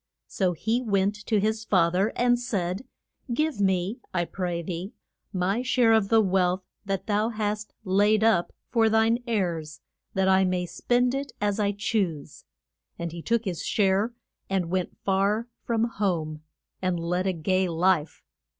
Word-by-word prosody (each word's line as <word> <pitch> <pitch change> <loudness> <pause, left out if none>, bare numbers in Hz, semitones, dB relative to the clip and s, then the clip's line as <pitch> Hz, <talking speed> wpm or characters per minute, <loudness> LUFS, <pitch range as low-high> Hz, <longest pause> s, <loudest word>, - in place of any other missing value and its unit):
So 185 -3 0
he 225 +9 0
went 200 -3 +1
to 215 -3 +3
his 220 +2 0
fa 175 -5 +3
ther 195 +4 +2
and 245 0 +3
said, 200 -2 -2 0.5
Give 300 -1 0
me, 190 +3 +1 0.2
I 175 -1 +1
pray 175 -1 -3
thee, 180 +3 -5 0.4
my 195 +4 0
share 250 -3 +3
of 215 -3 +3
the 225 -1 +5
wealth 185 -2 +1 0.2
thou 205 +3 0
hast 210 -1 -3
laid 205 +2 +3
up 205 -6 +3 0.2
for 225 -2 +4
thine 225 +2 +3
heirs, 170 -9 -2 0.4
that 190 0 +2
I 190 0 +5
may 180 -1 0
spend 245 +7 +1
it 275 0 -3
as 205 0 0
I 205 -1 +2
choose. 195 -8 -2 0.5
And 170 -1 -4
he 170 0 -7
took 235 +4 0
his 175 -4 -3
share, 200 +2 +2 0.4
and 185 -3 -1
went 185 -2 -2
far 200 +4 +1 0.2
from 230 -1 +1
home, 175 -9 -1 0.4
and 185 -2 0
led 180 +3 -1
a - - +3
gay 185 +3 +1
life. 170 -1 +1
195 Hz, 160 wpm, -26 LUFS, 180-220 Hz, 0.5 s, the